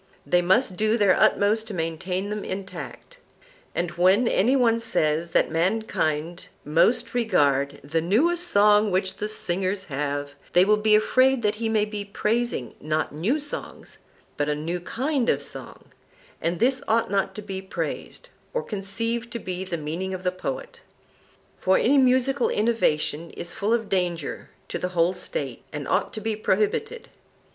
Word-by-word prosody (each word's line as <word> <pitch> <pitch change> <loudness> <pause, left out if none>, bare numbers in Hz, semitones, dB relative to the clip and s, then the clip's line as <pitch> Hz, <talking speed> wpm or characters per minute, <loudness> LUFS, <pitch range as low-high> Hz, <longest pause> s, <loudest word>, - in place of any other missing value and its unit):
They 175 - +3
must 185 +2 +2
do 215 +1 +2
their 200 -4 +4
utmost 220 +2 +3
to 210 - -6
maintain 180 +4 -3
them 210 -1 -3
intact. 195 - -7 0.6
And 175 -1 -1
when 190 +7 +3
any 235 +7 +3
one 230 -3 +3
says 160 -6 0
that - - +2
mankind 170 -3 -1 0.2
most 230 +11 +2
regard 145 - +1
'The 160 +3 -1
newest 330 - +2
song 210 -3 +5
which 190 0 0
the 210 - -2
singers 190 -1 -2
have,' 145 0 -2 0.2
they 180 +1 +6
will 210 +1 +4
be 210 0 +4
afraid 255 +3 +3
that 210 0 +1
he 225 - 0
may 215 -1 +2
be 210 -1 -5
praising, 210 - -1
not 155 0 -1
new 190 - 0
songs, 290 -1 -7 0.4
but 145 0 0
a 150 - +1
new 165 +4 -3
kind 255 - -1
of - - +1
song; - - -9 0.5
and 170 +1 -1
this 255 +3 +3
ought 225 -2 +1
not 195 -1 0
to 210 - -7
be 190 -1 -5
praised, 190 - -5 0.3
or 485 - 0
conceived 230 +4 -3
to - - -2
be 185 -4 -5
the 185 -2 -4
meaning 170 +5 -4
of 185 - -8
the 180 - +1
poet; 475 - -6 0.8
for 190 0 +3
any 275 +4 +4
musical 260 0 +3
innovation 170 -8 0
is 175 - -4
full 215 0 -1
of 230 -2 +1
danger 175 -6 -2 0.2
to - - -4
the 180 0 -4
whole 170 +2 +4
State, 135 -8 -5
and 145 -3 -5
ought - - +1
to 215 - -6
be 220 0 -1
prohibited. 440 - -1
200 Hz, 165 wpm, -25 LUFS, 170-230 Hz, 0.8 s, they